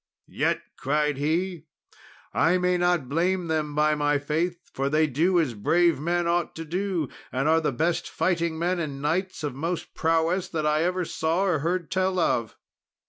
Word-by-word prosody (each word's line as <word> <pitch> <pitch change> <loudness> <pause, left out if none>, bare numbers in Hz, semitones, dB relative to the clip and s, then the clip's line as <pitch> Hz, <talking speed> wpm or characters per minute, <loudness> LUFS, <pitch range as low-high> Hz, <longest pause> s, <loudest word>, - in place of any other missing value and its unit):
"Yet," - - 0
cried 150 0 0
he, 165 +3 -1 0.7
"I 170 +3 +3
may 180 0 +1
not 175 -5 +1
blame 175 +5 0
them, 155 -2 -1
by 150 0 +3
my 145 -1 +1
faith, 160 +5 -1 0.2
for 135 +1 -1
they 155 +2 +3
do 165 +6 +2
as 150 -7 0
brave 165 +10 +2
men 175 +3 0
ought 170 0 0
to 165 - -6
do, 180 -1 -1 0.2
and 135 +3 0
are 160 +1 +4
the 150 - 0
best 165 +7 -1
fighting 170 -3 0
men 175 +2 0
and 145 -4 -4
knights 165 +4 -1
of 145 -3 -2
most 165 +6 -4
prowess 165 +3 +1
that 155 -3 -3
I 150 +1 +2
ever 180 0 0
saw 165 +4 0
or 175 -6 +1
heard 170 +3 -2
tell 185 0 +1
of." 115 - 0
165 Hz, 180 wpm, -26 LUFS, 150-175 Hz, 0.7 s, are